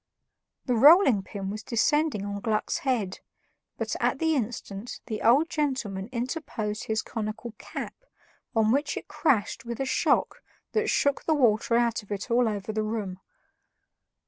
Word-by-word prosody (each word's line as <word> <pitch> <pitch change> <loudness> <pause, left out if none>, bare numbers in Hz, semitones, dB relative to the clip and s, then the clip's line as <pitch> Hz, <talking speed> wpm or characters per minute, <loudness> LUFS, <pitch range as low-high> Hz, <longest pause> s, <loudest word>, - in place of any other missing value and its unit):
The 250 - +1
rolling 275 - +7
pin 195 0 -6
was 215 +1 -5
descending 260 -1 +1
on 200 0 -4
Gluck's 215 -1 0
head, 230 -8 -1 0.6
but, - - -2
at - - +1
the 320 -1 +1
instant, 225 -3 -4
the 215 -3 -4
old 270 +8 +5
gentleman 255 -11 -2
interposed 235 -4 -3
his 220 0 -1
conical 220 +1 -5
cap, - - -6 0.6
on 220 -1 +3
which 285 +4 0
it - - -6
crashed 240 -11 0
with 235 -1 -6
a 270 - 0
shock 265 - +1 0.3
that 435 0 +1
shook 285 -1 +1
the 315 - +3
water 230 -4 +3
out 235 -1 +1
of 205 - -18
it 205 +4 -4
all 240 -1 +4
over 205 0 -4
the 215 - 0
room. 215 -4 -3
225 Hz, 155 wpm, -27 LUFS, 210-265 Hz, 0.6 s, rolling